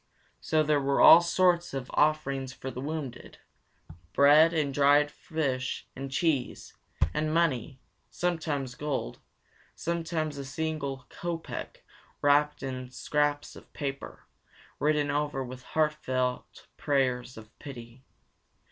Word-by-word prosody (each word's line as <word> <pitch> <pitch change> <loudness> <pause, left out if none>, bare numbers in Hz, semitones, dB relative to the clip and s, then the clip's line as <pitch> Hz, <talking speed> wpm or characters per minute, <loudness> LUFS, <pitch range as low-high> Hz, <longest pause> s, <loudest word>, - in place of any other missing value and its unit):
So 155 -1 +1
there 150 -1 +2
were 140 0 +1
all 165 - +10
sorts 175 -2 +2
of 130 -2 -5
offerings 140 -3 +1
for 130 - -7
the 125 - -6
wounded; 145 -3 -6 0.8
bread 150 +3 +6
and 150 -4 0
dried 145 +1 +4
fish 135 -6 -3
and 135 +1 -6
cheese; 140 -2 -1 0.4
and 155 +5 -1
money, 150 -6 0 0.3
sometimes 155 -7 -2
gold, 140 - -4 0.6
sometimes 160 -3 -2
a - - -4
single 140 -2 -4
kopek 170 -1 -6 0.4
wrapped 145 0 +2
in 130 -1 -5
scraps 145 +3 -1
of - - -15
paper, 140 -1 -6 0.5
written 150 0 +1
over 145 -2 -1
with 125 0 -9
heartfelt 130 -4 -2
prayers 130 -3 0
of 110 +1 -13
pity. 125 -3 -10
145 Hz, 115 wpm, -28 LUFS, 130-155 Hz, 0.8 s, all